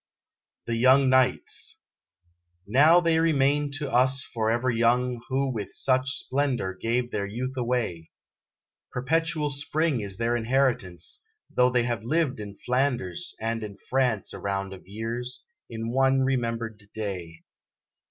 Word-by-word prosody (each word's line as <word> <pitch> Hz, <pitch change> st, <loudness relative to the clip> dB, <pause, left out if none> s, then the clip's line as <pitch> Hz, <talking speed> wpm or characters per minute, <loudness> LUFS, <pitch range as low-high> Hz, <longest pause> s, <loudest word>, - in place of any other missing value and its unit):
THE 115 Hz, -1 st, -1 dB
YOUNG 130 Hz, +2 st, +5 dB
KNIGHTS 130 Hz, -1 st, +1 dB, 0.9 s
Now 145 Hz, -, +6 dB
they 165 Hz, -1 st, +3 dB
remain 145 Hz, -2 st, +2 dB
to 145 Hz, 0 st, -3 dB
us 130 Hz, +2 st, +3 dB
forever 115 Hz, +2 st, 0 dB
young 120 Hz, +1 st, +2 dB
Who 135 Hz, 0 st, 0 dB
with 105 Hz, -3 st, -5 dB
such 130 Hz, 0 st, +2 dB
splendor 130 Hz, -8 st, -1 dB
gave 120 Hz, +5 st, -1 dB
their 100 Hz, -1 st, -2 dB
youth 130 Hz, +6 st, -4 dB
away; 120 Hz, -10 st, -2 dB, 0.8 s
Perpetual 150 Hz, +3 st, 0 dB
Spring 145 Hz, 0 st, 0 dB
is 100 Hz, -2 st, -6 dB
their 115 Hz, +1 st, +1 dB
inheritance, 115 Hz, -, -1 dB, 0.3 s
Though 125 Hz, 0 st, +5 dB
they 125 Hz, -1 st, +2 dB
have 120 Hz, -3 st, -2 dB
lived 140 Hz, 0 st, 0 dB
in 100 Hz, -1 st, -8 dB
Flanders 125 Hz, -, -1 dB
and 115 Hz, +1 st, -2 dB
in 100 Hz, -2 st, -7 dB
France 125 Hz, -5 st, 0 dB
A -, -, -7 dB
round 100 Hz, -1 st, -2 dB
of 95 Hz, -, -13 dB
years, 115 Hz, +4 st, -5 dB, 0.3 s
in 115 Hz, 0 st, -4 dB
one 135 Hz, +1 st, +3 dB
remembered 115 Hz, -4 st, -1 dB
day. 90 Hz, -6 st, -5 dB
125 Hz, 135 wpm, -26 LUFS, 110-135 Hz, 0.9 s, Now